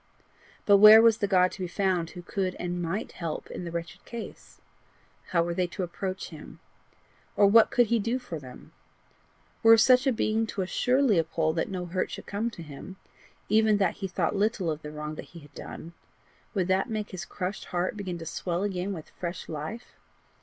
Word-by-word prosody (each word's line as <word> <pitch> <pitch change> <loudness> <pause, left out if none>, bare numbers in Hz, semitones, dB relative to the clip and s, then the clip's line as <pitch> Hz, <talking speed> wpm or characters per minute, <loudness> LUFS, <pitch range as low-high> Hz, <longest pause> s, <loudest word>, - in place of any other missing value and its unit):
But 200 -1 +7
where 215 +2 +10
was 225 -1 +5
the 205 - +1
God 185 -1 +4
to - - -10
be 180 - -2
found 180 -2 0
who 175 - -10
could 185 0 -2
and 175 0 -3
MIGHT 175 +6 -3
help 165 -4 -5
in 180 - -6
the 170 - -5
wretched 170 0 -6
case? 235 -2 -9 0.7
How 170 -2 +2
were 170 0 -2
they 180 +1 0
to 185 +2 -5
approach 185 +2 -5
him? - - -11 0.8
Or 205 - +5
what 220 +3 +6
could 245 - +4
he 230 +1 +1
do 230 +4 0
for 210 -11 -7
them? 130 -3 -13 0.9
Were 225 0 +8
such 255 +3 +5
a - - +5
being 220 -1 0
to 195 - -3
assure 250 +9 +1
Leopold 165 - +1
that 165 - 0
no 185 -2 -4
hurt 180 +2 -2
should - - -8
come 210 +3 -2
to 175 -7 -10
him 150 +5 -10 0.5
even 215 0 +4
that 195 - +1
he 195 - -3
thought 180 - -1
little 200 -4 0
of 155 0 -5
the 150 - -7
wrong 150 0 -5
that - - -8
he - - -8
had 145 -1 -17
done 165 +1 -9 0.6
would 185 -3 +1
that 190 0 +1
make 215 -2 -3
his 185 -2 -5
crushed 190 +1 -5
heart 180 +2 -2
begin 190 -4 -5
to 165 - -8
swell 175 +2 -3
again 195 -1 -2
with 160 -4 -9
fresh 175 -1 -6
life? 160 +10 -6
185 Hz, 205 wpm, -27 LUFS, 170-215 Hz, 0.9 s, where